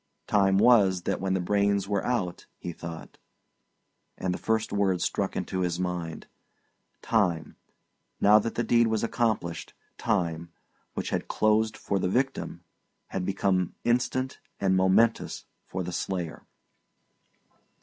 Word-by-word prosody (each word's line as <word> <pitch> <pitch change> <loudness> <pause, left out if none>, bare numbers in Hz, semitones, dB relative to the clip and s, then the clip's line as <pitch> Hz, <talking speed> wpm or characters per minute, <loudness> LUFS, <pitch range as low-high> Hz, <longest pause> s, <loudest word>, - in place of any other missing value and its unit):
"Time 95 -2 +3
was 100 -6 +5
that - - -1
when 95 0 0
the - - +1
brains 100 +1 +1
were 100 -1 0
out," 95 -8 -2
he 85 - -6
thought; 80 0 -9 1.0
and 90 -1 -1
the - - -5
first 110 -1 0
word 95 -3 +2
struck - - -1
into 95 - -2
his 90 -1 -1
mind. 90 -3 -3 0.8
Time, 90 -8 +1 0.6
now 105 +1 +7
that 115 +2 -3
the 120 - 0
deed 115 0 +4
was 110 -1 0
accomplished 110 -9 -1 0.2
time, 85 -6 -1 0.4
which - - -3
had - - -2
closed 110 0 +2
for 100 - -1
the 90 - 0
victim, 130 +6 -1 0.5
had 95 - -3
become 95 -1 0
instant 130 +2 0 0.2
and 95 -1 +2
momentous 95 +5 +2 0.2
for 95 0 -3
the 90 0 -5
slayer. 90 -4 -4
95 Hz, 135 wpm, -27 LUFS, 90-110 Hz, 1.0 s, now